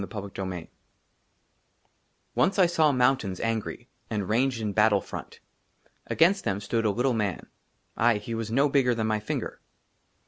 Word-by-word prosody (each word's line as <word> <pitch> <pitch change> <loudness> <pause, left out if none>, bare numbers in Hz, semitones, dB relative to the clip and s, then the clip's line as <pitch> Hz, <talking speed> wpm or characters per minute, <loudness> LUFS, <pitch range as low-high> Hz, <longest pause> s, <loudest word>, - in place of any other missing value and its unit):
i - - -3
22 100 -1 -6
i - - -2
XXII 90 -3 -7 1.6
ONCE 195 - +2
1 185 -3 +6
SAW 160 -3 +3
MOUNTAINS 125 -7 +1
ANGRY, 115 -1 -3 0.2
AND 105 -4 -2
RANGED 125 +2 +1
IN 105 -2 -2
BATTLE 105 -2 +4
FRONT. - - -9 0.7
AGAINST 190 +5 +3
THEM 100 0 -1
STOOD 115 +2 -1
A - - +4
LITTLE 125 +5 +1
MAN; 105 -5 -2 0.5
AYE, 115 -1 +4
HE 105 +3 -6
WAS 115 -1 -3
NO 135 +6 +3
BIGGER 135 -4 +2
THAN 110 -1 -1
MY 110 -1 0
FINGER. 105 - -4
115 Hz, 165 wpm, -27 LUFS, 105-130 Hz, 1.6 s, 1